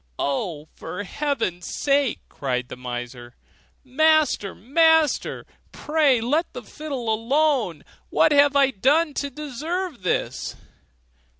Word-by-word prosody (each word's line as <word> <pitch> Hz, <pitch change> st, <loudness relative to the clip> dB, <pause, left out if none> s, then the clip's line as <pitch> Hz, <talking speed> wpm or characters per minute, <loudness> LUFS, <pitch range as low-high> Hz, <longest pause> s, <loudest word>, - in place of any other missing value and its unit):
'Oh, 150 Hz, +2 st, -2 dB
for 180 Hz, +5 st, -6 dB
heaven's 225 Hz, -, -2 dB
sake!' 280 Hz, -3 st, +1 dB
cried 125 Hz, -2 st, -3 dB
the -, -, -7 dB
miser, 120 Hz, -1 st, -7 dB, 0.5 s
'Master! 305 Hz, -6 st, +2 dB
master! 320 Hz, -, +2 dB, 0.3 s
pray 295 Hz, -5 st, +2 dB
let 290 Hz, +9 st, 0 dB
the -, -, -7 dB
fiddle 280 Hz, -6 st, -6 dB
alone. 235 Hz, -, +1 dB, 0.3 s
What -, -, +3 dB
have 285 Hz, -1 st, +5 dB
I 275 Hz, -1 st, +4 dB
done 290 Hz, -, +2 dB
to 280 Hz, 0 st, -3 dB
deserve 300 Hz, -, -4 dB
this? 180 Hz, -, -2 dB
270 Hz, 110 wpm, -23 LUFS, 185-300 Hz, 0.5 s, have